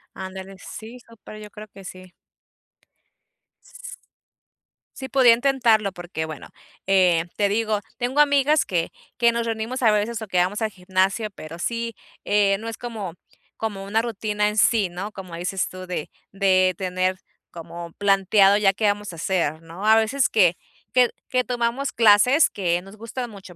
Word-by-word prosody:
Ándale, 190 0 -8
sí, 225 +6 -10
súper, 230 -2 -13
yo 210 - -10
creo 210 +1 -11
que 195 -1 -14
sí. 185 0 -11 1.5
S - - -11 1.0
sí 265 -2 -7
podría 255 -4 +6
intentarlo 235 -6 +2
porque 175 -3 -5
bueno, 155 -2 -8 0.4
eh, 180 -4 +3
te 205 -1 +2
digo, 215 0 0 0.2
tengo 250 +4 0
amigas 290 +1 +4
que 170 -3 -1 0.3
que 235 -1 +4
nos 235 0 -2
reunimos 225 +3 -3
a 220 -3 +5
veces 210 +2 -1
o - - -5
que 185 -3 -1
vamos 185 +5 +1
al 220 - 0
gimnasio, 190 +3 -1
pero 165 -3 -10
sí, 230 +4 -3 0.3
eh, 200 -1 +3
no 225 +1 -7
es 225 - -5
como 215 -8 -6 0.4
como 205 -3 -4
una 220 +3 0
rutina 210 -2 -1
en 210 - -4
sí, 215 -2 +3
¿no?, 180 +4 -6
como 185 -3 -9
dices 180 +2 -2
tú 185 0 -9
de 180 -4 -5 0.2
de 185 -2 +3
tener 185 0 -1 0.3
como 170 0 -9
planteado 195 0 +4
ya 200 -2 +3
qué 210 +2 -1
vamos 205 -2 -1
a - - -10
hacer, 165 -2 -1
¿no?, 170 +6 -7
a 220 0 +7
veces 235 +4 +2
que 180 -5 +3 0.4
que 250 -1 +4 0.2
que 255 0 +1
tomamos 245 +3 -1
clases 230 +7 +5
que 175 -3 -1
nos 195 +3 -13
gustan 230 +2 -6
mucho. 195 -3 -12
205 Hz, 170 wpm, -23 LUFS, 185-230 Hz, 1.5 s, a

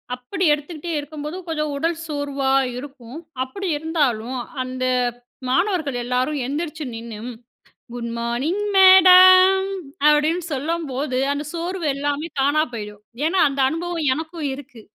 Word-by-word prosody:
அப்பிடி 360 +9 -3
எடுத்துக்கிட்டே 310 +3 -5
இருக்கும்போது, 300 +3 -7
கொஞ்சம் 305 -2 -2
உடல் 330 +2 -1
சோர்வா 285 -2 -2 0.3
இருக்கும். 270 0 -9 0.2
அப்பிடி 385 +9 -6
இருந்தாலும் 265 -7 -1 0.3
அந்த 255 0 -5 0.7
மாணவர்கள் 325 -4 0
எல்லாரும் 255 +4 -1
எந்திரிச்சு 305 +2 -4
நின்னு 225 -1 -7 0.8
குட் 235 -1 -5
மார்னிங் 250 +12 -2
மேடம்! 375 0 +8 0.4
அப்பிடின்னு 310 +3 +3
சொல்லும்போது 280 -3 -2 0.2
அந்த 290 +1 -4
சோர்வு 345 0 -4
எல்லாமே 290 +3 -2
தானா 295 +3 +3
போயிடும். 210 -2 -8 0.2
ஏன்னா, 370 +2 +1
அந்த 275 0 -2
அனுபவம் 330 -2 -2
எனக்கும் 320 -2 -4
இருக்கு. 255 -5 -13
295 Hz, 115 wpm, -21 LUFS, 260-335 Hz, 0.8 s, மேடம்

